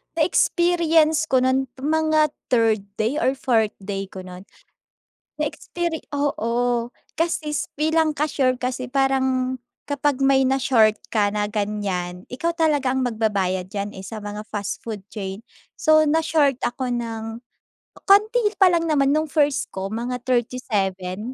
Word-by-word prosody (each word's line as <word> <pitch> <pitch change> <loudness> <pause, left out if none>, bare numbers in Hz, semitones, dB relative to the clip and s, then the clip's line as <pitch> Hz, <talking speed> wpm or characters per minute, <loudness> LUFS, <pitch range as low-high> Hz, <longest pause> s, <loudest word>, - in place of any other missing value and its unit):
Na-experience 325 -1 +3
ko 260 -3 +3
nun 260 +1 +2
mga 310 +2 +2 0.2
3rd 225 -4 +2
day 230 +9 0
or 265 -3 +1
4th 225 -5 +1
day 195 0 -4
ko 190 0 -9
nun. 185 +2 -11 0.9
Na-experi 345 -2 -3 0.2
oo, 245 -4 0 0.3
kasi 325 -2 -1
s - - -2
bilang 315 +1 +1
cashier 285 -4 +1
kasi 255 0 -3
parang 260 -1 +1 0.3
kapag 285 -1 0
may 270 0 +4
na-short 255 -5 +3 0.2
ka 205 -2 +1
na 210 0 -1
ganyan, 200 -4 -3
ikaw 335 +7 -2
talaga 295 -6 +1
ang 265 - 0
magbabayad 205 -6 0
diyan 200 +1 -5
eh, 190 - -8
sa 215 +1 -7
mga 210 +1 -6
fast 205 -2 -4
food 220 -3 -5
chain. 195 -1 -6 0.3
So, 310 0 +4
na-short 300 -3 +2
ako 245 0 -2
ng 225 -1 -4 0.7
konti 430 +3 +5
pa 380 -2 +5
lang 335 -1 +1
naman 280 -3 +3
nung 310 +2 +1
1st 290 -2 +1
ko 195 +1 -4
mga 240 +2 -4
37. 215 -4 -2
255 Hz, 140 wpm, -22 LUFS, 215-300 Hz, 0.9 s, konti